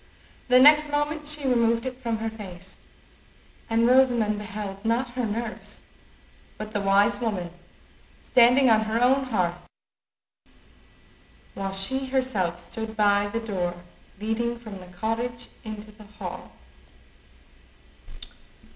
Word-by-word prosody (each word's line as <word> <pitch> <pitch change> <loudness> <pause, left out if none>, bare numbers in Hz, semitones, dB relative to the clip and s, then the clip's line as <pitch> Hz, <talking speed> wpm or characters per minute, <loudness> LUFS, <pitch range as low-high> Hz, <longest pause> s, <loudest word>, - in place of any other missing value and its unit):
The 250 0 +6
next 300 +2 +7
moment 295 +1 -1
she 300 -2 0
removed 235 -1 +2
it 260 -1 -3
from 230 -3 -2
her 225 +1 -3
face, 190 -4 -10 0.9
and 230 +1 +3
Rosamond 240 -4 +3
beheld—not 215 +3 -3
her 245 0 -2
nurse, 220 +1 -5 0.7
but 215 0 -7
the 210 -2 -2
wise 200 +1 +3
woman—standing 220 +6 0
on 220 -2 +4
her 220 +1 0
own 265 +2 +3
hearth, 175 -7 -2 1.9
while 195 0 -4
she 265 +8 -1
herself 255 -10 0
stood 220 +4 -7
by 205 -1 +3
the 220 +3 -3
door 185 -6 -2 0.4
leading 235 +3 -1
from 215 -4 -9
the 180 - -12
cottage 230 +6 -4
into 215 -1 -8
the 210 0 -16
hall. 185 -4 -7
225 Hz, 115 wpm, -25 LUFS, 200-245 Hz, 1.9 s, next